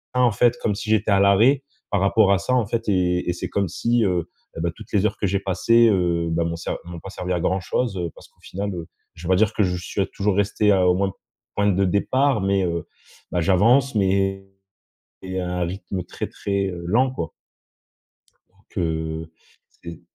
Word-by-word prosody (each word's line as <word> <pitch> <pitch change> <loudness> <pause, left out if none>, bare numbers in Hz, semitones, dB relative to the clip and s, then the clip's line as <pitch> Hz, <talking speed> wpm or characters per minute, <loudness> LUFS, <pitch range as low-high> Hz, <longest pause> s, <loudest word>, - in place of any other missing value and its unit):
en 125 -2 +4
fait, 120 +3 +2
comme 105 -3 0
si 105 +1 -6
j'étais 110 -1 +2
à 100 - +4
l'arrêt, 115 +8 +4 0.3
par 100 -2 +1
rapport 100 0 +4
à 100 - +4
ça, 115 +6 -1
en 120 -4 +3
fait 115 0 -2
et 90 -2 +1
et - - +1
c'est 90 - -5
comme 100 -2 0
si, 115 +6 +1
heu 90 -3 -1 0.3
et - - -3
bah, 85 0 0
toutes - - -13
les 100 0 +3
heures - - 0
que 100 - 0
j'ai 100 +1 0
passées, 115 +4 +3
heu, 85 -4 +1
bah, 85 +1 +1
m'ont 85 0 -2
ser 85 - -5
m'ont 85 -1 -8
pas 95 - -9
servi 90 -1 -4
à 90 - 0
grand 95 +3 0
chose. 95 +1 -2
Heu, 85 -1 -2
parce - - -15
qu'au - - -37
final, 100 +1 -4
heu, 85 -2 -6 0.3
je 80 - -13
vais - - -3
pas - - +5
dire 105 +1 +2
que 105 - +2
je 90 -1 0
suis 95 +2 -2
toujours 100 -1 +1
resté 105 +1 +2
à 95 -2 +3
au 90 - +4
moins 95 0 0 0.4
point 105 0 +2
de 100 0 +2
départ, 130 +8 +2
mais, 95 0 +1
heu, 85 0 -2 0.5
bah, 90 - 0
j'avance, 115 +10 +4
mais 95 0 +1 0.8
mais 95 0 -4
à 90 0 -3
un 90 - +1
rythme, 95 +1 -5
heu, - - -4
très, - - -6
très, 100 -1 -2
heu, 85 -2 -6
lent, 125 +8 +2
quoi 85 -9 -5 1.2
donc, - - -30
heu. 80 -1 -2 0.4
C'est 85 -2 -11
95 Hz, 225 wpm, -23 LUFS, 90-105 Hz, 1.2 s, pas